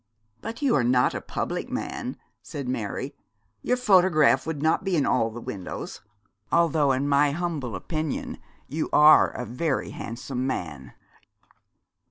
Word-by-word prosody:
'But 230 +5 -6
you 275 - +3
are 135 - +3
not 125 +1 +3
a - - -4
public - - -4
man,' - - -4 0.2
said 135 +4 -6
Mary. 125 +2 -3 0.5
'Your 250 - +1
photograph 185 - +4
would 160 -3 -3
not 160 +5 +1
be 190 -2 0
in 145 -4 +2
all 115 -3 +2
the 115 +2 -8
windows; 95 -5 -6 0.5
although, 160 -4 +3
in 135 +2 0
my 145 +1 +4
humble 155 - -3
opinion, 155 - -4 0.3
you 155 +3 -3
are 150 +1 +7
a 125 - -6
very 135 +6 -2
handsome 125 +2 -4
man.' 75 - -5
145 Hz, 145 wpm, -25 LUFS, 125-165 Hz, 0.5 s, are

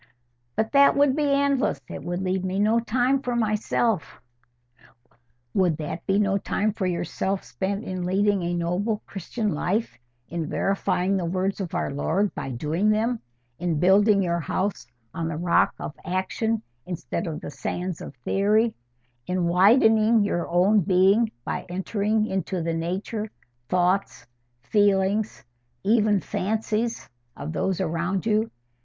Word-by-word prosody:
"But 220 0 0
that 280 0 +5
would 285 -2 +4
be 295 -2 +1
endless. 280 - +2
It - - -7
would 175 +2 -3
leave 185 0 -1
me 185 +1 -2
no 215 +3 +3
time 250 +4 +1
for 245 -3 -2
myself." 215 -4 0 1.3
"Would 180 -5 +2
that 160 +2 -5
be 195 0 +3
no 200 -1 +2
time 210 +2 -1
for 190 -3 -2
yourself 180 +2 -2
spent 195 +2 -3
in 185 -3 -4
leading 200 +2 +2
a 175 0 -1
noble, 185 +6 -1
Christian 205 +2 -3
life; 195 - -1 0.3
in 165 -2 -4
verifying 195 -1 0
the 180 - -1
words 185 +3 -1
of 180 -1 -4
our 175 - -1
Lord 175 +8 0
by - - -5
doing 155 - 0
them; 225 +3 +1 0.4
in 170 -4 -1
building 200 +3 +5
your 170 -1 0
house 185 -2 -2 0.3
on 165 -1 -3
the 165 -2 -3
rock 170 +1 +2
of - - -5
action 195 +5 -1 0.2
instead 175 0 -4
of 155 -2 -4
the - - -7
sands 180 +4 -4
of - - -8
theory; 215 +3 +2 0.5
in 180 -1 0
widening 215 +4 +5
your 175 -4 -1
own 185 +5 +4
being 195 +6 +3
by - - -3
entering 205 +4 0
into 190 -3 -2
the 165 0 -1
nature, 190 +6 -3 0.4
thoughts, 180 -6 +1 0.4
feelings, 205 - +1 0.4
even 215 -2 +3
fancies 220 +4 -2 0.3
of 150 +3 -5
those 190 +3 -1
around 175 +2 -1
you? 220 0 +2
195 Hz, 145 wpm, -25 LUFS, 175-215 Hz, 1.3 s, that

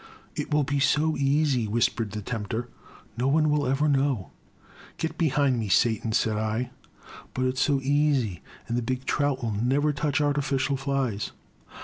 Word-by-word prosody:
It - - -4
will 150 0 +3
be 140 +1 -1
so 150 +3 +2
easy,*' 140 -4 +2
whispered 115 0 0
the 105 +1 -6
tempter, 110 +2 -3 0.2
" - - -23
no 125 - +1
one 155 +2 +3
will 145 -2 +1
ever 135 +3 +2
know! 135 -7 +1 0.2
" - - -29
'* - - -21
Get 160 -1 -3
behind 140 -5 +2
me, 110 -3 -3
Satan, 110 +2 +2
said 110 -1 +1
I. 110 +3 -1 0.6
But 130 - 0
it*s 130 0 -1
so 140 0 +2
easy, 140 - +1
— - - -24
and 115 - -2
the 120 - +1
big 130 +2 -3
trout 145 -3 0
will 115 - -1
never 135 +8 +1
touch 145 +1 0
artificial 140 -2 +1
flies 135 -6 -2
135 Hz, 185 wpm, -26 LUFS, 115-145 Hz, 0.6 s, will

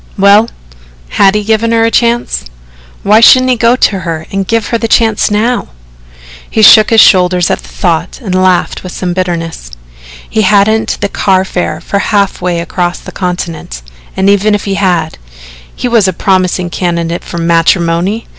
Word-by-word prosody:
Well, 200 +3 +4 0.6
had 195 - +2
he 210 - -1
given 220 +2 0
her 225 0 +2
a 230 - 0
chance? 235 - -1 0.6
Why 210 +2 +4
shouldn't 255 +2 +5
he - - +2
go 235 +1 +2
to 205 -6 0
her 165 -3 -5
and 195 -1 -3
give 230 -2 -1
her 230 - -1
the 230 - -2
chance 220 -2 +1
now? 225 +4 -1 0.8
He 220 - 0
shook 215 0 +7
his 225 - +3
shoulders 180 -2 +3
at - - -1
the - - -15
thought 170 -2 -3
and 205 -8 -5
laughed 185 -1 0
with 185 - -9
some 180 -1 -3
bitterness. 170 - -4 0.6
He 220 - -1
hadn't 210 +2 +1
the - - 0
car 190 -1 0
fare 180 -1 -3
for 200 - -3
half 200 -2 -1
way 175 -1 -2
across 175 +1 -3
the - - -11
continent 170 - -5 0.3
and 190 +1 +1
even 205 +1 +2
if 205 - -5
he 200 - -2
had, 175 -5 -1 0.6
he - - -3
was 230 -5 +2
a 185 - -1
promising 185 -1 -1
candidate 170 -1 -3
for - - -8
matrimony! 170 +4 0
195 Hz, 175 wpm, -10 LUFS, 175-215 Hz, 0.8 s, shook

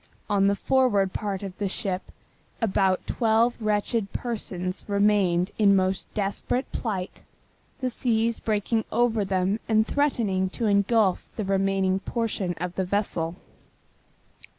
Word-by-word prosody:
On 200 -1 +4
the 200 - +3
forward 205 -6 +2
part 200 -3 -3
of 190 -2 -6
the 205 - 0
ship 190 0 -3 0.5
about 190 -4 +1
twelve 230 +1 +2
wretched 215 -1 0
persons 185 -6 -3
remained 200 -3 +2
in 200 -2 +6
most 190 0 0
desperate 210 +5 -2
plight, 195 -6 -4 0.6
the 255 - 0
seas 230 -1 0
breaking 220 +1 0
over 230 -2 +2
them 190 +2 0
and 220 0 +4
threatening 220 -11 0
to 230 - -3
engulf 200 -1 +2
the 215 - -3
remaining 195 -1 +1
portion 205 -4 -2
of 180 0 -3
the 190 - +1
vessel. 180 -3 -1
200 Hz, 130 wpm, -26 LUFS, 190-225 Hz, 0.6 s, in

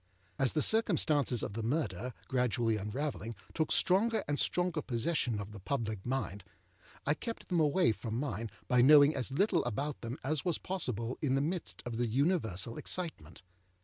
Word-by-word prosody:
As 135 -2 +2
the 155 - +1
circumstances 155 - +2
of - - -4
the 115 - -3
murder, 120 - -2
gradually 120 -3 +1
unravelling, 110 - -4 0.2
took 160 - 0
stronger 215 +4 +3
and 145 0 -1
stronger 175 -3 +1
possession 120 -3 -1
of 100 +1 -6
the 105 - -9
public 110 -2 -3
mind, 125 -7 -2 0.6
I 145 - +3
kept 230 +9 -7
them 175 -3 +2
away 155 -1 +3
from 110 0 -5
mine 115 -4 -3 0.2
by 125 -1 +4
knowing 145 +3 +7
as 130 -1 -2
little 185 +5 +2
about 135 +5 -3
them 120 +3 -5
as 145 +2 -1
was 175 -3 0
possible 125 - -3
in 135 -4 +1
the - - +2
midst 170 +3 -3
of 120 -2 -4
the 120 0 +1
universal 115 - 0
excitement. 155 - -3
135 Hz, 170 wpm, -32 LUFS, 115-155 Hz, 0.6 s, knowing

